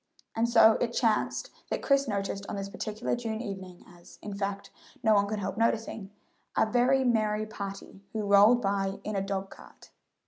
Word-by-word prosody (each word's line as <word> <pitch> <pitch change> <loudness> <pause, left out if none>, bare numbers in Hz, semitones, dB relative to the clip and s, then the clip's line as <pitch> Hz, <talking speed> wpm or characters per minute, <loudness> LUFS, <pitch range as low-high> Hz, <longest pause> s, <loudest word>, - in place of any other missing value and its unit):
And 230 +1 +1
so 225 -2 +6
it 235 -1 0
chanced 225 -3 0 0.2
that - - -3
Chris 275 -1 +3
noticed 200 -1 -3
on - - -3
this 195 0 -4
particular 215 +4 -3
June 225 -2 -4
evening 190 -5 -7
as, 175 -1 -16
in 210 - -5
fact, 200 0 -4 0.3
no 220 -1 +5
one 200 -1 +3
could 215 +1 -2
help 200 +1 -4
noticing 225 -3 -1 0.5
a - - +5
very 250 +4 +3
merry 215 -3 +1
party 195 -2 -8
who 220 -1 -3
rolled 205 +4 +6
by 195 0 -1
in 215 - -4
a 195 - 0
dog 195 0 -3
cart. - - -15
210 Hz, 180 wpm, -29 LUFS, 195-225 Hz, 0.5 s, so